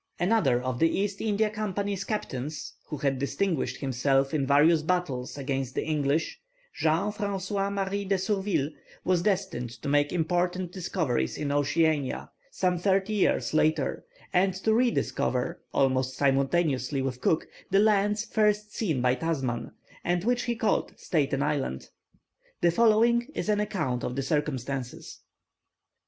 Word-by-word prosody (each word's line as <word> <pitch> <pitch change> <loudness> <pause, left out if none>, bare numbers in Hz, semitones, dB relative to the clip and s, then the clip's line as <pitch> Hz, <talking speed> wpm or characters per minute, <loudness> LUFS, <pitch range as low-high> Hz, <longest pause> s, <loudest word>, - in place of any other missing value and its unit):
Another 175 - +3
of 125 -1 -3
the 165 - +4
East 200 +2 -1
India 215 0 +1
Company's 200 -2 -2
captains, 150 - -4
who 150 - -5
had 135 -2 0
distinguished 140 -3 -1
himself 135 +1 +1
in 140 -3 0
various 150 +3 +5
battles 155 -7 -2
against 135 -2 -3
the - - -1
English, 150 0 0 0.3
Jean 165 - +1
François 200 -1 -2
Marie 200 0 -2
de 195 0 +1
Surville, 190 -6 0 0.3
was 180 -2 +2
destined 190 - -1
to 115 +3 -9
make 145 +1 +2
important 175 +1 0
discoveries 165 - -1
in 145 -2 -2
Oceania 145 0 +1 0.2
some 180 -2 0
thirty 195 +3 +1
years 205 -5 +1
later, 155 0 +1 0.3
and 185 +1 +3
to 220 +4 +1
re 245 +2 +4
discover, 125 - -1
almost 130 -1 +1
simultaneously 135 -1 +1
with 130 -2 -3
Cook, 160 - +1 0.2
the 195 - +3
lands 210 0 +3
first 210 -1 +1
seen 160 - 0
by 125 0 +4
Tasman, 130 -5 -2 0.3
and 175 0 0
which 245 +2 +1
he 240 -1 -1
called 220 -1 0
Staten 140 -4 0
Island. 145 - -2 0.7
The 170 - +4
following 235 +4 +4
is - - -2
an 210 -1 +2
account 160 -12 -1
of 125 - -3
the 135 - -1
circumstances. 135 -3 -3
165 Hz, 145 wpm, -27 LUFS, 135-200 Hz, 0.7 s, various